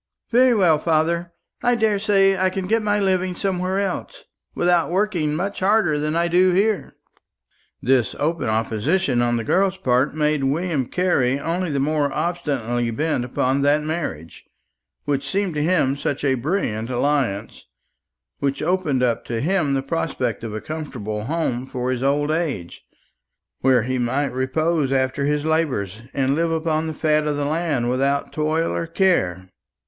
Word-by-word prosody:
"Very 250 +1 +5
well, 170 -7 +4
father; 170 +2 0 0.3
I 245 0 +3
daresay 205 -3 +3
I 185 0 +2
can 190 0 -4
get 225 +4 +1
my 210 -1 +1
living 185 -2 0
somewhere 185 0 -1
else, 195 -2 -4 0.3
without 175 -1 +2
working 175 -5 0
much 195 +5 -3
harder 190 -6 +2
than 150 +1 -1
I 170 +1 +2
do 180 +2 +4
here." 205 +3 0 0.9
This 130 -2 +2
open 160 0 -1
opposition 120 - 0
on 120 0 +1
the 115 - -2
girl's 190 - +1
part 130 +4 +1
made 150 -2 +1
William 145 -1 0
Carley 140 -8 +1
only 170 +4 -2
the 140 -2 -1
more 145 0 +1
obstinately 135 -10 -1
bent 130 +2 -1
upon 130 +2 0
that 145 +2 +3
marriage, 150 - -5 0.6
which 140 -1 -1
seemed 195 0 -1
to 150 - -1
him 150 -5 +2
such 140 0 -3
a 135 -2 +3
brilliant 125 - -2
alliance, 125 -5 -1 0.7
which 140 +1 -1
opened 160 -7 +1
up 120 -2 +1
to 115 -1 -3
him 155 -1 +1
the 135 - -1
prospect 135 -6 -2
of 115 - -4
a 110 0 -5
comfortable 110 -8 -5
home 130 -4 -2
for 130 -1 -2
his 125 -1 -2
old 145 +2 +1
age, 150 - -3 0.8
where 130 -3 +3
he 130 +1 -2
might 130 +3 0
repose 140 +3 0
after 130 +1 0
his 150 +1 0
labours, 130 - -1
and 135 -1 +1
live 165 +2 0
upon 160 -1 0
the 160 - -3
fat 155 -1 +1
of 150 - 0
the 145 0 -1
land 150 -5 0
without 135 +3 0
toil 155 +2 0
or 165 - -2
care. 130 - +1
150 Hz, 160 wpm, -22 LUFS, 130-175 Hz, 0.9 s, Very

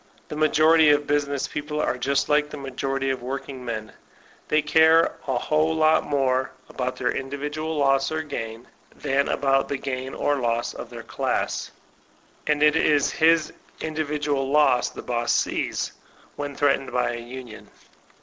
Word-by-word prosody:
The - - -5
majority 155 +1 +5
of 145 0 +3
business 145 -1 0
people 150 0 -4
are - - 0
just 135 +2 0
like 150 0 +2
the 150 - -7
majority 135 0 -2
of 130 - -4
workingmen; 125 -4 -5 0.6
they 155 0 +2
care 160 +2 +4
a 130 -2 0
whole 155 +4 +1
fat 155 0 +4
more 130 -2 0 0.2
about 125 0 -3
their 125 - -1
individual 145 +4 -4
loss 135 0 +2
or 155 0 -2
gain 115 -5 -6 0.3
than 135 +1 0
about 135 -1 +1
the 140 - -1
gain 130 -1 -4
or 145 0 +1
loss 120 -2 -1
of - - -8
their - - -9
class. - - -2 0.8
And 150 0 +2
it 150 0 +5
is 150 -3 +3
his 165 0 +3 0.3
individual 150 -3 -2
loss 145 -4 +3
the - - -9
boss 120 -1 -1
sees, - - -1 0.4
when 145 -1 -5
threatened 140 -1 +1
by 125 - 0
a 120 - -5
union. 120 -1 -10
140 Hz, 155 wpm, -24 LUFS, 130-150 Hz, 0.8 s, majority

